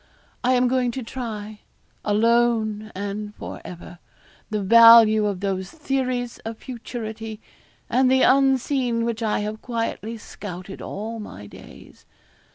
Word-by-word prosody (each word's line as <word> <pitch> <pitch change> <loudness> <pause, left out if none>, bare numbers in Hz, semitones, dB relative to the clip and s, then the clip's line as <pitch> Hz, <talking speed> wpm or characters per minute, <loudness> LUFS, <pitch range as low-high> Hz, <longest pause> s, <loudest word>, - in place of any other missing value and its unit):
I 255 +1 +3
am 250 0 +3
going 250 0 +1
to 260 - -4
try, 215 -4 -6 0.4
alone 220 0 +1
and 205 +2 -5
for - - -8
ever, 175 0 -10 0.5
the 210 -2 -2
value 230 0 +8
of 195 -2 -3
those 190 -2 -2
theories 255 -5 -2
of 225 0 -7
futurity 225 -3 -7 0.5
and 255 +2 +3
the 260 0 +4
unseen 260 -3 +2
which 235 -1 -3
I 215 -2 0
have 215 +1 -5
quietly 230 -1 -3
scouted 190 -3 -9
all 225 +3 -5
my 105 - -9
days. 100 - -15
225 Hz, 130 wpm, -23 LUFS, 210-245 Hz, 0.5 s, value